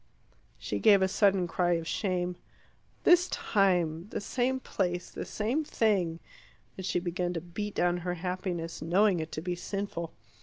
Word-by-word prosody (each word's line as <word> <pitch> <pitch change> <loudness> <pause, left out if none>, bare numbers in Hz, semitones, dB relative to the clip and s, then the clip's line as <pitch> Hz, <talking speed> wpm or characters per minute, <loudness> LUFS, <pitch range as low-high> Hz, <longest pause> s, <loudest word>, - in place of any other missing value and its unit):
She - - -3
gave 200 -3 +6
a - - +4
sudden 190 -2 +3
cry 175 +1 +1
of 165 -1 -2
shame. 180 -1 -1 0.7
"This 355 +1 +6
time 180 - +1
the - - -3
same 255 +5 0
place 180 -7 -2
the - - -5
same 235 +9 -1
thing" 195 - +1 0.6
and 190 - -7
she 180 - 0
began 175 0 -2
to 170 - -2
beat 200 +5 -5
down 175 0 +2
her 180 0 -3
happiness, 180 -1 -4
knowing 180 +3 +3
it 160 0 -4
to 155 - -3
be 180 0 -1
sinful. 175 -2 -4
180 Hz, 160 wpm, -30 LUFS, 175-205 Hz, 0.7 s, gave